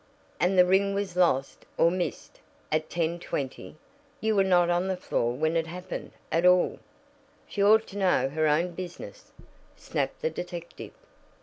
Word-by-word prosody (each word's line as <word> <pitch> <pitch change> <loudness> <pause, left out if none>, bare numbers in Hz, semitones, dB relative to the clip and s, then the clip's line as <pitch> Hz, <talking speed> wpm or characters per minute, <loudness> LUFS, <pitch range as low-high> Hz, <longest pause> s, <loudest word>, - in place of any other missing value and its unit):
"And 185 +2 +2
the 180 - +7
ring 195 +2 +2
was 200 -3 -3
lost, 140 -7 +1
or 170 - +4
missed, 180 -1 -4 0.3
at 155 0 0
10:20. 165 -6 -3 0.4
You 220 -3 0
were 195 - +4
not 175 -2 +3
on 175 +2 +1
the 190 -1 -1
floor 120 -8 -1
when 155 +5 0
it 165 -1 0
happened, 180 +2 -7 0.2
at 165 - +1
all." 180 0 +4 0.7
"She 200 - -1
ought 220 +2 +5
to 205 - -6
know 180 -9 +3
her 155 +2 0
own 165 +4 +2
business," 180 0 -9 0.4
snapped - - -3
the 480 - +1
detective. 175 -1 -7
180 Hz, 160 wpm, -27 LUFS, 165-190 Hz, 0.7 s, the